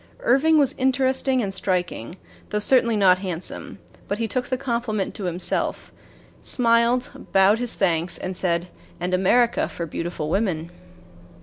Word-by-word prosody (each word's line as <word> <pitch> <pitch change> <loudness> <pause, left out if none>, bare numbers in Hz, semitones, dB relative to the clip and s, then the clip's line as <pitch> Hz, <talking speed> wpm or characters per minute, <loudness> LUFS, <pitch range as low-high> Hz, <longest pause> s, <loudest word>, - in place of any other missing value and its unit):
Irving 320 - +3
was 280 -2 +3
interesting 260 -1 +1
and 195 -1 -3
striking, 180 - -2 0.3
though 210 - -1
certainly 235 +1 +4
not 185 -2 +5
handsome; 185 -3 -5 0.3
but 205 - -2
he 230 0 -1
took 250 +3 -2
the 255 - -1
compliment 235 -6 -2
to 200 - -5
himself, 175 0 -2 0.5
smiled, 235 +1 +1
bowed 195 +3 +4
his 245 -1 -1
thanks, 175 -2 0
and 185 0 -5
said: 175 -1 -1 0.3
"And 180 +1 -2
America 235 +6 +2
for 170 - -5
beautiful 165 -1 -4
women." 175 -5 -1
205 Hz, 140 wpm, -23 LUFS, 180-245 Hz, 0.5 s, not